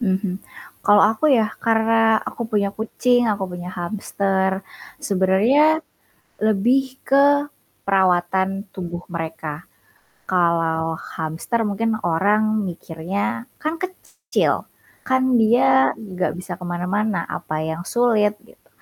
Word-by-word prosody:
Mhm, 190 -3 -1 0.4
kalau 205 0 +5
aku 305 +8 +1
ya, 225 -6 +3
karena 225 0 +3
aku 235 -2 -5
punya 200 -2 0
kucing, 245 +2 +1
aku 205 -2 0
punya 180 0 -6
hamster. 190 +1 -1 0.3
Sebenernya, 230 - +3 0.6
lebih 245 +6 +2
ke 280 +1 +5 0.5
perawatan 190 +1 +1
tubuh 175 -2 -7
mereka, 160 -2 -5 0.6
kalau 165 -2 +1 0.2
hamster 165 +9 -2
mungkin 220 +2 0
orang 210 +5 +2
mikirnya, 180 +7 -4 0.2
"Kan 315 +2 -2
kecil, 370 0 -2 0.4
kan 260 -1 +3
dia 215 - +4
gak 185 -4 -3
bisa 180 0 -7
kemana-mana, 180 +2 -1
apa 155 0 -4
yang 160 +2 -4
sulit?" 220 -4 +2
Gitu, - - -23
200 Hz, 105 wpm, -21 LUFS, 175-225 Hz, 0.6 s, kalau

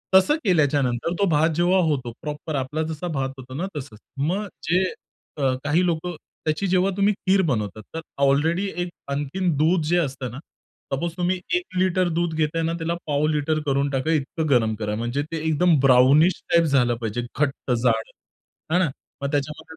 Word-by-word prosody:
तसं 240 +11 +6
केल्याच्यानंतर 145 - +2
तो 200 - +4
भात 155 +1 +3
जेव्हा 175 +2 +3
होतो 130 -6 -1
प्रॉपर 150 0 -5
आपला 135 +4 -2
जसा 160 +2 -4
भात 135 -5 -1
होतो 130 0 -10
ना 180 +6 -2
तसंच. 120 -6 -8 0.2
मग 185 +9 -1 0.2
जे 180 +2 +4 0.5
क 135 -2 +1
काही 160 +5 +2
लोकं 175 0 -1 0.3
त्याची 155 +6 0
जेव्हा 185 +2 +2
तुम्ही 200 +1 +3
खीर 190 0 +2
बनवतात 110 -2 -2
तर 165 - -3 0.2
ऑलरेडी 160 +8 +2
एक 175 - -2 0.2
आणखीन 145 +6 -1
दूध 165 +3 +3
जे 175 +3 +2
असतं 135 -6 -2
ना, 130 - -8 0.5
सपोज 165 +4 -1
तुम्ही 180 +1 0 0.2
एक 360 - -3
लिटर 185 -1 +2
दूध 170 -2 0
घेताय 160 +1 0
ना 165 +1 0
त्याला 165 0 -2
पाव 145 0 +1
लिटर 155 0 0
करून 140 0 +1
टाका 135 +4 0
इतकं 155 +1 -1
गरम 110 -4 +3
करा. 105 0 -3
म्हणजे 120 +5 -2
ते 165 - -2
एकदम 160 +1 +3
ब्राउनिश 135 +6 +5
टाइप 170 0 +6
झालं 125 -5 +3
पाहिजे. 115 0 -3 0.2
घट्ट 140 -3 -1
जाड 115 -2 +1 0.6
आहे 180 - +4
ना. 155 - +1 0.3
मग 140 +1 -2
त्याच्यामध्ये 145 +1 -2
150 Hz, 180 wpm, -23 LUFS, 135-175 Hz, 0.6 s, तसं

